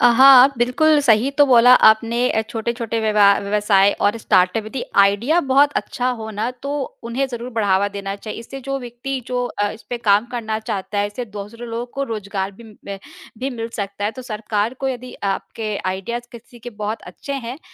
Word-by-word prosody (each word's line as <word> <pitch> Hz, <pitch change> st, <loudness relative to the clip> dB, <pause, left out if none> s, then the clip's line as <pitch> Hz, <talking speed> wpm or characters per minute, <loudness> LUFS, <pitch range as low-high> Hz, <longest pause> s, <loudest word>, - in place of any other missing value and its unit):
अ, -, -, +6 dB
हाँ, 270 Hz, 0 st, +8 dB
बिल्कुल 295 Hz, +6 st, +3 dB
सही 235 Hz, +2 st, +3 dB
तो 290 Hz, -, +8 dB
बोला 245 Hz, -1 st, +7 dB, 0.2 s
आपने 225 Hz, +2 st, +2 dB
अ, 220 Hz, -, +1 dB
छोटे-छोटे 230 Hz, 0 st, -3 dB
विवा 215 Hz, -2 st, +3 dB
व्यवसाय 200 Hz, -1 st, +3 dB
और 205 Hz, +3 st, +2 dB
स्टार्टअप, 190 Hz, +2 st, +2 dB
यदि 250 Hz, +3 st, -5 dB, 0.2 s
आइडिया 210 Hz, -, +4 dB
बहुत 285 Hz, +2 st, +5 dB
अच्छा 250 Hz, 0 st, -2 dB
हो 220 Hz, 0 st, -6 dB
ना, 215 Hz, +3 st, -2 dB
तो 255 Hz, +3 st, -8 dB, 0.3 s
उन्हें 250 Hz, +4 st, -1 dB
ज़रूर 240 Hz, 0 st, -6 dB
बढ़ावा 200 Hz, -3 st, +1 dB
देना 200 Hz, -1 st, -5 dB
चाहिए। 215 Hz, +2 st, -8 dB
इससे 270 Hz, +4 st, -9 dB
जो 275 Hz, +1 st, -3 dB
व्यक्ति 245 Hz, +2 st, -5 dB
जो 250 Hz, 0 st, -1 dB
अ, 205 Hz, -3 st, -2 dB
इसपे 235 Hz, +2 st, -7 dB
काम 210 Hz, 0 st, +3 dB
करना 220 Hz, -2 st, -3 dB
चाहता 205 Hz, -1 st, -4 dB
है, 205 Hz, -, +1 dB
इससे 225 Hz, +4 st, -6 dB
दूसरे 210 Hz, +3 st, -9 dB
लोगों 230 Hz, +1 st, -4 dB
को 275 Hz, -, -2 dB
रोज़गार 200 Hz, -4 st, -4 dB
भी 230 Hz, +4 st, -15 dB
म 200 Hz, -2 st, -10 dB, 0.4 s
भी 270 Hz, -, -2 dB
मिल 230 Hz, -2 st, -5 dB
सकता 200 Hz, 0 st, -4 dB
है। 210 Hz, -, +1 dB
तो 255 Hz, -, -9 dB
सरकार 215 Hz, 0 st, -2 dB
को 270 Hz, -, -1 dB
यदि 250 Hz, -1 st, -6 dB
आपके 210 Hz, +2 st, -3 dB
आइडियाज़ 235 Hz, +6 st, -5 dB
किसी 240 Hz, +1 st, -13 dB
के 245 Hz, +1 st, -9 dB
बहुत 210 Hz, +1 st, -5 dB
अच्छे 280 Hz, -, -8 dB
हैं, 260 Hz, 0 st, -5 dB
230 Hz, 195 wpm, -20 LUFS, 205-250 Hz, 0.4 s, हाँ